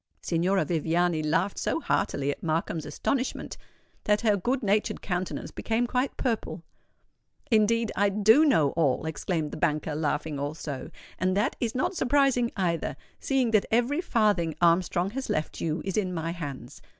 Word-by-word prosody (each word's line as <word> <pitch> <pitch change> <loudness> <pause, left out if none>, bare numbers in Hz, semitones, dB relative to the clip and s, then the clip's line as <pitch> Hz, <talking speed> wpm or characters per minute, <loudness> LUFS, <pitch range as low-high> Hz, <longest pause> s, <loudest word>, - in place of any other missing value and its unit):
Signora 185 +3 +1
Viviani 165 0 +1
laughed 165 +6 0
so - - 0
heartily 140 - 0
at - - -8
Markham's 160 0 -2
astonishment, 265 -1 -2 0.5
that 210 0 +2
her 215 -3 +3
good 250 +7 -1
natured 210 +1 +1
countenance 180 -1 -3
became 225 +2 -1
quite 250 +2 -1
purple. 225 -8 -2 0.9
"Indeed, 225 0 +3
I 200 +1 +3
do 215 +8 +5
know 165 - +4
all," 155 -3 +1
exclaimed 160 0 -2
the - - -6
banker, 155 0 0
laughing 150 -1 -2
also; 145 -2 -5 0.3
"and 185 +1 +1
that 210 +7 +1
is 235 -1 -2
not 260 +9 0
surprising, 265 -4 +2
either, 170 -4 -1 0.2
seeing 260 -4 +1
that 215 -3 +3
every 245 +8 +1
farthing 205 - +1
Armstrong 175 +2 +2
has 270 +3 -5
left 155 - -2
you 160 0 -2
is 190 0 -2
in 185 -4 0
my 165 0 -2
hands. 145 -6 -7
185 Hz, 155 wpm, -27 LUFS, 160-230 Hz, 0.9 s, do